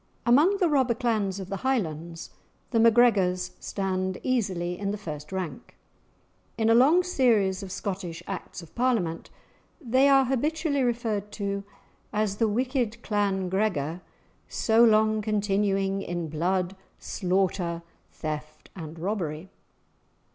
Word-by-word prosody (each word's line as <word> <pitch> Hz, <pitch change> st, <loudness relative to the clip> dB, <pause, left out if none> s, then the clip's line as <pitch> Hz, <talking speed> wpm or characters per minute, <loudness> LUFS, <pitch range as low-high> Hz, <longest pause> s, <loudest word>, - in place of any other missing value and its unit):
Among 295 Hz, +12 st, +5 dB
the 370 Hz, -3 st, +3 dB
robber 265 Hz, -6 st, +2 dB
clans 215 Hz, -5 st, 0 dB
of 190 Hz, -1 st, -7 dB
the 195 Hz, -, -3 dB
Highlands, 170 Hz, -, -2 dB, 0.4 s
the 230 Hz, -, +2 dB
MacGregors 205 Hz, -6 st, +4 dB
stand 190 Hz, -1 st, -2 dB
easily 190 Hz, -9 st, -1 dB
in 200 Hz, -1 st, -2 dB
the 205 Hz, -, -2 dB
first 150 Hz, -6 st, -7 dB
rank. 190 Hz, -3 st, -5 dB, 0.8 s
In 225 Hz, 0 st, +3 dB
a -, -, +7 dB
long 290 Hz, +10 st, +5 dB
series 225 Hz, -, +2 dB
of 195 Hz, -2 st, -7 dB
Scottish 185 Hz, -3 st, -5 dB
Acts 180 Hz, -, -6 dB
of 160 Hz, -, -15 dB
Parliament, 225 Hz, -10 st, 0 dB, 0.5 s
they 260 Hz, -1 st, +3 dB
are 270 Hz, -1 st, +6 dB
habitually 290 Hz, +3 st, 0 dB
referred 225 Hz, -4 st, -1 dB
to 200 Hz, -1 st, -3 dB, 0.5 s
as 210 Hz, -1 st, 0 dB
"the 225 Hz, -, +2 dB
wicked 240 Hz, 0 st, -1 dB
clan 200 Hz, -3 st, 0 dB
Gregor, 180 Hz, -4 st, -1 dB, 0.5 s
so 225 Hz, +1 st, +3 dB
long 215 Hz, -1 st, +4 dB
continuing 200 Hz, -2 st, 0 dB
in 175 Hz, -3 st, -4 dB
blood, 180 Hz, +4 st, -1 dB, 0.2 s
slaughter, 180 Hz, -3 st, -1 dB, 0.3 s
theft, 155 Hz, -1 st, -6 dB
and 160 Hz, -3 st, -8 dB
robbery." 175 Hz, -2 st, -3 dB
200 Hz, 125 wpm, -27 LUFS, 180-235 Hz, 0.8 s, a